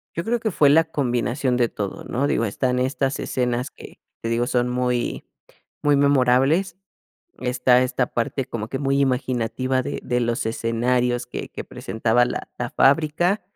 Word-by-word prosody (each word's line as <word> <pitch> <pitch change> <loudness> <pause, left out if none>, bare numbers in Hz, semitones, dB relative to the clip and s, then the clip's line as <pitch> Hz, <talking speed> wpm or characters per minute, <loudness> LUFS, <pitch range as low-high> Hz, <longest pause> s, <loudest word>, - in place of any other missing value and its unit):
Yo 170 - -2
creo 235 +4 0
que 220 - -1
fue 150 -7 +4
la 160 +3 +5
combinación 125 -3 -1
de 120 -1 +3
todo, 100 -3 -5
¿no? 130 +3 -1
Digo, 115 -5 +1
están 125 +4 -1
estas 135 +1 -1
escenas 125 0 -1
que, - - -14 0.2
te 115 - -3
digo, 120 +1 0
son 125 0 +1
muy 125 -1 -1 0.6
muy 145 -1 +4
memorables. 140 +6 +3 0.6
Está, 125 0 +3
esta 130 0 0
parte 120 +3 -1
como 110 -2 -5
que 135 - -3
muy 135 0 +1
imaginativa 130 -1 0
de - - -4
de 125 0 0
los 120 -1 -1
escenarios 120 +2 0
que 125 - -6
que - - -7
presentaba 120 -1 0
la - - -5
la 120 - -2
fábrica. 160 +8 +2
125 Hz, 165 wpm, -23 LUFS, 120-140 Hz, 0.6 s, la